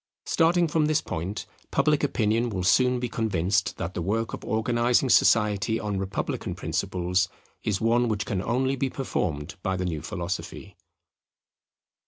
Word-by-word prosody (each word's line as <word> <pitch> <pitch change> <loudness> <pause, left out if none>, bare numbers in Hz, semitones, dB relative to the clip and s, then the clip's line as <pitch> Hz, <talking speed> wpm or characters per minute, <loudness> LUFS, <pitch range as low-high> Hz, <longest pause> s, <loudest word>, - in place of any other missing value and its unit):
Starting 170 +1 +3
from 155 -1 +1
this 155 -1 +3
point, 90 +6 -4 0.2
public 150 -1 +2
opinion 115 -3 +1
will 95 -4 -3
soon 125 +7 +4
be 125 - -2
convinced 105 -3 0
that 85 +1 -4
the 90 - -3
work 110 +6 -1
of - - -6
organizing 120 +3 +1
society 105 0 +3
on 105 -2 -2
republican 95 0 -3
principles 90 +1 -1 0.3
is 100 -3 0
one 120 +2 +2
which 105 -2 -1
can 95 -3 -2
only 130 +5 0
be 135 0 -1
performed 80 - -3
by 95 -1 -1
the 90 - -2
new 80 -4 -2
philosophy. 85 +2 -5
110 Hz, 150 wpm, -26 LUFS, 95-125 Hz, 0.3 s, soon